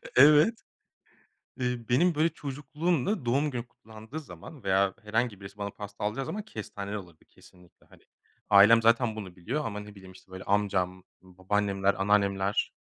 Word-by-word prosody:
Evet. 150 Hz, -, +6 dB, 1.0 s
Eee, 125 Hz, -2 st, -2 dB
benim, 165 Hz, +8 st, +3 dB
böyle, 155 Hz, +2 st, +3 dB
çocukluğumda 150 Hz, -, -2 dB
doğum 140 Hz, +5 st, +1 dB
günü 120 Hz, -2 st, -5 dB
kutlandığı 110 Hz, +6 st, -10 dB
zaman 150 Hz, -1 st, -12 dB
veya 95 Hz, 0 st, +2 dB
herhangi 110 Hz, -1 st, -1 dB
birisi 100 Hz, +1 st, -11 dB
bana 100 Hz, 0 st, -3 dB
pasta 105 Hz, +1 st, -8 dB
alacağı 110 Hz, +6 st, -2 dB
zaman 215 Hz, -, -4 dB
kestaneli 105 Hz, -, -6 dB
alırdı 85 Hz, -6 st, -11 dB
kesinlikle. 90 Hz, -1 st, -21 dB
Hani, -, -, -21 dB, 0.5 s
ailem 105 Hz, +3 st, +7 dB
zaten 115 Hz, 0 st, +3 dB
bunu 95 Hz, -5 st, -8 dB
biliyor 125 Hz, -, -3 dB
ama, 105 Hz, -2 st, -4 dB
ne 105 Hz, 0 st, -11 dB
bileyim, 95 Hz, -2 st, -13 dB
işte, 95 Hz, 0 st, -19 dB
böyle, 95 Hz, 0 st, -8 dB
amcam, 95 Hz, -3 st, 0 dB, 0.2 s
babaannemler, 95 Hz, +1 st, 0 dB
anneannemler 100 Hz, 0 st, +1 dB
105 Hz, 150 wpm, -28 LUFS, 100-130 Hz, 1.0 s, ailem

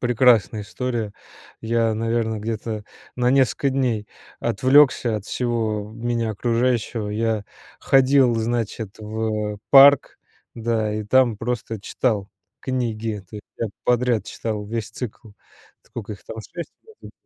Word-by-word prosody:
Прекрасная 120 Hz, -3 st, +3 dB
история. 115 Hz, 0 st, -3 dB, 0.5 s
Я, 115 Hz, 0 st, +1 dB
наверно, 115 Hz, -1 st, -1 dB
где-то 110 Hz, 0 st, -4 dB, 0.3 s
на 125 Hz, 0 st, +2 dB
несколько 135 Hz, +1 st, +2 dB
дней 120 Hz, -6 st, -1 dB, 0.3 s
отвлёкся 130 Hz, -1 st, +4 dB
от 105 Hz, -, -6 dB
всего 110 Hz, -4 st, -2 dB
меня 115 Hz, 0 st, -1 dB
окружающего. 115 Hz, 0 st, 0 dB
Я 110 Hz, -1 st, -1 dB, 0.3 s
ходил, 135 Hz, -2 st, +4 dB
значит, 115 Hz, -2 st, -2 dB
в 110 Hz, -1 st, -3 dB
парк, 140 Hz, 0 st, +7 dB, 0.4 s
да, 110 Hz, -2 st, -1 dB
и 105 Hz, 0 st, -3 dB
там 120 Hz, 0 st, +3 dB
просто 115 Hz, -1 st, -3 dB
читал 105 Hz, -1 st, -1 dB, 0.3 s
книги 115 Hz, -4 st, -2 dB
этой, 100 Hz, +2 st, -10 dB, 0.2 s
прям 115 Hz, -3 st, -3 dB
подряд 125 Hz, -2 st, +2 dB
читал 110 Hz, -2 st, -4 dB
весь 115 Hz, 0 st, -4 dB
цикл. 115 Hz, -2 st, -7 dB, 0.5 s
Сколько 110 Hz, -2 st, -8 dB
их 95 Hz, -, -18 dB
там? -, -, -8 dB
25, 160 Hz, -, -7 dB
что 445 Hz, 0 st, -16 dB
ли. -, -, -12 dB
115 Hz, 125 wpm, -22 LUFS, 110-125 Hz, 0.5 s, парк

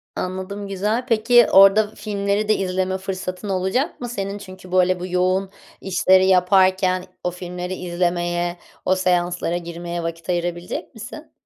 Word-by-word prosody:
Anladım, 190 Hz, +2 st, -4 dB
güzel. 210 Hz, +6 st, -1 dB
Peki, 230 Hz, +1 st, +5 dB
orada 205 Hz, +2 st, +6 dB
filmleri 205 Hz, 0 st, -1 dB
de 215 Hz, -, +4 dB
izleme 185 Hz, 0 st, -1 dB
fırsatın 190 Hz, +1 st, -5 dB
olacak 190 Hz, -, -1 dB
mı 245 Hz, -, -4 dB
senin? 200 Hz, -3 st, -4 dB
Çünkü, 185 Hz, -2 st, -12 dB
böyle, 185 Hz, 0 st, +3 dB
bu 180 Hz, -, -5 dB
yoğun 185 Hz, +1 st, +1 dB, 0.3 s
işleri 185 Hz, 0 st, +3 dB
yaparken 185 Hz, 0 st, +3 dB, 0.2 s
o 180 Hz, -, -1 dB
filmleri 180 Hz, +1 st, -6 dB
izlemeye, 175 Hz, -1 st, -1 dB, 0.3 s
o 185 Hz, -, +3 dB
seanslara 180 Hz, -1 st, 0 dB
girmeye 170 Hz, 0 st, -5 dB
vakit 165 Hz, +1 st, -6 dB
ayırabilecek 175 Hz, +3 st, -3 dB
misin? 245 Hz, +8 st, -10 dB
185 Hz, 135 wpm, -21 LUFS, 180-200 Hz, 0.3 s, orada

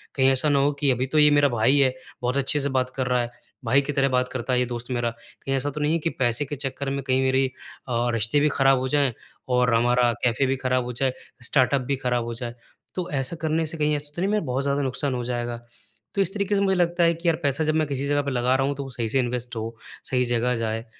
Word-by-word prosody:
कहीं 135 Hz, -1 st, +4 dB
ऐसा 135 Hz, +3 st, +1 dB
ना 140 Hz, -, +3 dB
हो 140 Hz, +1 st, +3 dB
कि 140 Hz, -2 st, +3 dB
अभी 125 Hz, +1 st, 0 dB
तो 155 Hz, +3 st, +1 dB
ये 150 Hz, 0 st, +7 dB
मेरा 145 Hz, -1 st, +4 dB
भाई 120 Hz, +4 st, +3 dB
है, 130 Hz, -2 st, +4 dB, 0.3 s
बहुत 125 Hz, +2 st, 0 dB
अच्छे 140 Hz, +2 st, +1 dB
से 140 Hz, 0 st, -1 dB
बात 130 Hz, 0 st, -1 dB
कर 130 Hz, -2 st, -1 dB
रहा 125 Hz, -1 st, +2 dB
है, 120 Hz, -, -3 dB, 0.4 s
भाई 140 Hz, +1 st, +4 dB
की 145 Hz, -, -3 dB
तरह 135 Hz, 0 st, +2 dB
बात 125 Hz, -1 st, +1 dB
करता 130 Hz, 0 st, -2 dB
है 125 Hz, -, +3 dB
ये 125 Hz, -, +2 dB
दोस्त 120 Hz, 0 st, -5 dB
मेरा, 120 Hz, -1 st, 0 dB, 0.3 s
कहीं 135 Hz, 0 st, -1 dB
ऐसा 135 Hz, +2 st, -1 dB
तो 150 Hz, +1 st, -5 dB
नहीं 150 Hz, +2 st, +2 dB
है 165 Hz, -, +1 dB
कि 165 Hz, -, -1 dB
पैसे 120 Hz, -1 st, 0 dB
के 145 Hz, +2 st, -5 dB
चक्कर 135 Hz, 0 st, -3 dB
में 140 Hz, 0 st, -3 dB
कहीं 130 Hz, 0 st, +1 dB
मेरे 130 Hz, 0 st, +2 dB, 0.4 s
अ, 120 Hz, 0 st, +1 dB
रिश्ते 115 Hz, +5 st, +2 dB
भी 150 Hz, +1 st, +3 dB
खराब 135 Hz, -2 st, +3 dB
हो 130 Hz, -, -2 dB
जाए 140 Hz, -2 st, +2 dB, 0.4 s
और 125 Hz, -1 st, +3 dB
हमारा 120 Hz, +1 st, +3 dB
कैफे 125 Hz, +3 st, +2 dB
भी 135 Hz, +1 st, +1 dB
खराब 130 Hz, -1 st, 0 dB
हो 125 Hz, -, -5 dB
जाए, 130 Hz, +2 st, 0 dB, 0.3 s
स्टार्टअप 130 Hz, +1 st, +3 dB
भी 140 Hz, +2 st, -1 dB
खराब 125 Hz, -2 st, -1 dB
हो 115 Hz, -, -4 dB
जाए। 120 Hz, 0 st, -6 dB, 0.4 s
तो 180 Hz, -2 st, -3 dB
ऐसा 135 Hz, +3 st, -1 dB
करने 160 Hz, 0 st, 0 dB
से 160 Hz, +1 st, -6 dB
कहीं 150 Hz, -1 st, +1 dB
ऐसा 145 Hz, 0 st, -6 dB
तो 175 Hz, -, -3 dB
नहीं 195 Hz, -, +1 dB
मेरा 210 Hz, -4 st, +1 dB
बहुत 130 Hz, +1 st, -1 dB
ज़्यादा 140 Hz, +1 st, 0 dB
नुकसान 135 Hz, +1 st, -1 dB
हो 125 Hz, -, -3 dB
जाएगा? 120 Hz, -1 st, -3 dB, 0.6 s
तो 200 Hz, -, +1 dB
इस 195 Hz, 0 st, +1 dB
तरीके 205 Hz, 0 st, 0 dB
से 200 Hz, -, +2 dB
मुझे 190 Hz, -1 st, +2 dB
लगता 175 Hz, 0 st, +2 dB
है 170 Hz, 0 st, +4 dB
कि 170 Hz, +1 st, -5 dB
यार 165 Hz, -, +4 dB
पैसा 140 Hz, +2 st, +1 dB
जब 155 Hz, 0 st, +1 dB
मैं 155 Hz, -2 st, +1 dB
किसी 140 Hz, -1 st, -2 dB
जगह 145 Hz, 0 st, +2 dB
पर 140 Hz, -1 st, -3 dB
लगा 125 Hz, +1 st, +2 dB
रहा 135 Hz, +1 st, +1 dB
हूँ, 145 Hz, -, -1 dB
तो 140 Hz, -, -5 dB
वो 135 Hz, -, -8 dB
सही 120 Hz, -3 st, -3 dB
से 135 Hz, -, +2 dB
इन्वेस्ट 120 Hz, -1 st, -2 dB
हो, 115 Hz, +1 st, -4 dB, 0.3 s
सही 125 Hz, -1 st, +1 dB
जगह 120 Hz, +1 st, +1 dB
जाए 115 Hz, 0 st, -2 dB
135 Hz, 280 wpm, -24 LUFS, 125-145 Hz, 0.6 s, ये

